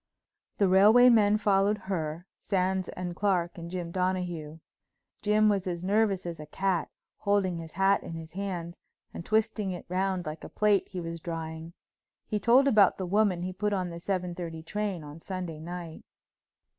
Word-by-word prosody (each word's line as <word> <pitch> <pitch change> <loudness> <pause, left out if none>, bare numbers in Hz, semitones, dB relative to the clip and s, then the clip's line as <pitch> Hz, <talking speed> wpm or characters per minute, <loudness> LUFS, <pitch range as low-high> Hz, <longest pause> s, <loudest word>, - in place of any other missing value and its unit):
The 200 - +3
railway 210 +7 +7
men 210 -3 +5
followed 205 0 +2
her, 170 -4 -4
Sands 190 -1 0
and 180 -1 -5
Clark 180 -3 0
and 170 0 -7
Jim 175 -2 -4
Donahue. 180 -4 -2 0.6
Jim 215 +1 +3
was 200 -2 +1
as 175 -1 -3
nervous 200 -1 +1
as 170 -2 -5
a 150 - -8
cat, 185 0 -1 0.3
holding 200 -3 +1
his 160 -1 -9
hat 195 +1 +3
in - - -8
his 160 0 -8
hands 175 -3 -5 0.3
and - - -6
twisting 215 0 0
it 175 - -8
round 185 0 -1
like 155 +1 -6
a - - -8
plate 210 -2 +2
he 185 - -6
was 165 0 -5
drying. 165 0 -6 0.5
He 210 - -2
told 245 +7 +5
about 215 -7 +5
the 190 - -3
woman 190 -2 +2
he 185 +1 -3
put 210 +2 -1
on 185 -3 -1
the 170 - -7
seven 180 -1 -2
thirty 165 -2 -6
train 200 -2 -3
on 150 +2 -10
Sunday 180 -3 -5
night. 170 0 -7
185 Hz, 175 wpm, -28 LUFS, 170-200 Hz, 0.6 s, railway